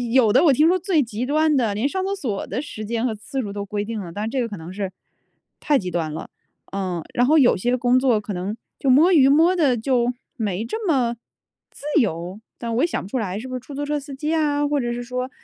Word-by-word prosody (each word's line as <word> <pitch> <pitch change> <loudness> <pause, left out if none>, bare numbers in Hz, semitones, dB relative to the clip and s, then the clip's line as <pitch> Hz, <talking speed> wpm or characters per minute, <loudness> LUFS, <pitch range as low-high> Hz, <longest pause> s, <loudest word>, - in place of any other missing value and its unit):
有 230 -5 +5
的 260 +8 +5
我 285 - +6
听 300 +5 +4
说 370 +1 +2
最 340 -6 +2
极 225 +1 -4
端 305 +2 +2
的 225 -6 +1
连 225 +7 +1
上 380 +5 -2
厕 395 - -1
所 230 - -3
的 250 +7 -3
时 215 -7 -7
间 230 +2 -1
和 230 - 0
次 265 +6 -4
数 205 - -5
都 200 0 -4
规 205 0 -3
定 220 0 -4
了， 175 -4 -7
但 205 +3 -4
是 220 - -2
这 265 - -2
个 240 - 0
可 210 - -7
能 165 +2 -9
是 195 -1 -4 0.7
太 295 - +2
极 185 -7 -4
端 160 -3 -2
了， 155 - -7 0.4
嗯。 185 -4 -3
然 245 - +3
后 315 +3 +5
有 255 -4 +5
些 245 +7 +1
工 250 +1 +3
作 245 -5 +2
可 205 0 -5
能 190 +4 -3 0.2
就 275 - 0
摸 310 +9 +6
鱼 280 -6 +6
摸 330 +6 +5
得 285 -7 +3
就 245 +1 +1 0.2
没 210 -4 -2
这 440 - -4
么 250 -6 +2 0.6
自 - - -15 0.2
由， 180 -2 -3 0.2
但 230 -1 -3
我 250 - +2
也 340 - +4
想 - - -2
不 - - -9
出 255 - -2
来 200 -2 -3
是 255 - -7
不 255 - -5
是 - - -3
出 275 +3 -11
租 285 - -3
车 295 0 -1
司 285 0 -9
机 300 +3 -2
啊， 290 -2 +1
或 290 -1 +1
者 240 -1 -1
是 240 - -4
说， 250 +1 -3
245 Hz, 290 characters per minute, -22 LUFS, 210-285 Hz, 0.7 s, 我